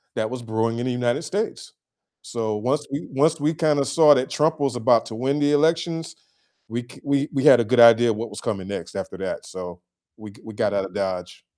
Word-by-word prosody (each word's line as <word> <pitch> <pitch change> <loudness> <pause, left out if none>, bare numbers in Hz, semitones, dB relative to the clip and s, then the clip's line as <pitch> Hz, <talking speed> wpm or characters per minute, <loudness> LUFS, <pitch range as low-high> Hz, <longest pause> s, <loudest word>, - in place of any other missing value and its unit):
that 110 - -1
was 130 0 -6
brewing 115 0 -2
in 120 - -3
the 130 - -1
United 125 +5 -1
States. 200 +9 -4 0.5
So, 110 -2 -3
once 135 +7 -1
we 140 +3 -5
once 155 +4 +2
we 155 +3 +1
kinda 150 -3 +1
saw 150 +2 +5
that 130 0 -1
Trump 155 +1 0
was 135 -3 0
about 120 -1 +3
to 110 - -7
win 135 +5 -1
the 145 0 +2
elections, 165 +2 0 0.5
we 120 +1 -4
c - - -15
we 140 0 0
we 135 -1 -1
had 135 -5 +7
a 120 - +1
good 120 +2 +3
idea 115 0 +7
what 110 +2 -5
was - - -9
coming 95 -3 -4
next 100 - -6
after - - -6
that, - - -5
so, 90 -1 -9 0.4
we 110 -2 -11
g 100 - -19
we 110 - -9
got 100 - -1
out 100 -1 0
of 95 - -11
Dodge. 90 -2 -4
125 Hz, 230 wpm, -23 LUFS, 110-145 Hz, 0.5 s, had